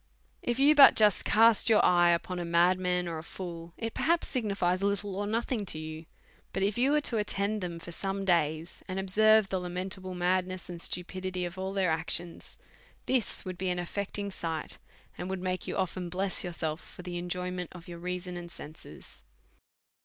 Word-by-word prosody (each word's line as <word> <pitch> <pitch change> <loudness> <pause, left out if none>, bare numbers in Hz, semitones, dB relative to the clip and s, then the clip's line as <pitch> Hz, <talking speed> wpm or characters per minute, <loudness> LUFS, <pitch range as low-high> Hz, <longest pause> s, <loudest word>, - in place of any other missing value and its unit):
If 240 0 -1
you 275 +2 +5
had 305 - +5
but 280 - +10
just 210 -3 +4
cast 225 +1 +5
your 220 - +5
eye 175 -1 +5
upon 175 +1 0
a - - -2
madman 180 +1 +2
or 165 -2 -4
a - - -9
fool, 170 -1 -8
it 225 -1 -4
perhaps 335 +1 +5
signifies 200 -7 0
little 200 -1 -1
or 205 +1 -2
nothing 230 +1 -1
to 155 - -1
you; 155 +1 -7 0.5
but 195 - 0
if 200 +1 +1
you 260 +4 +3
was 300 -1 +2
to 235 - 0
attend 210 0 -1
them 175 -2 -4
for 170 +1 -9
some 195 +2 -3
days, 165 -2 0
and 185 - -3
ob 190 -1 -3
serve 215 0 +5
the 190 - -1
lamentable 185 +1 -5
madness 185 +1 -1
and 170 -1 -7
stupidity 185 +1 -3
of 175 +2 -7
all 190 0 -3
their 190 -4 +1
actions, 165 +1 -3 0.5
this 255 -5 0
would 185 -1 -6
be 190 0 -1
an 180 - 0
affecting 200 +3 -3
sight, 165 -4 -4 0.4
and 180 - -4
would 190 0 -3
make 185 0 -2
you - - -3
often 185 -1 -2
bless 190 +2 -2
yourself 165 -3 -3
for 180 - -11
the 175 -1 -4
enjoyment 180 0 -3
of 175 -1 -12
your 170 -1 -8
reason 180 0 -4
and 175 0 -7
senses. 155 -2 -11
185 Hz, 195 wpm, -29 LUFS, 175-200 Hz, 0.5 s, but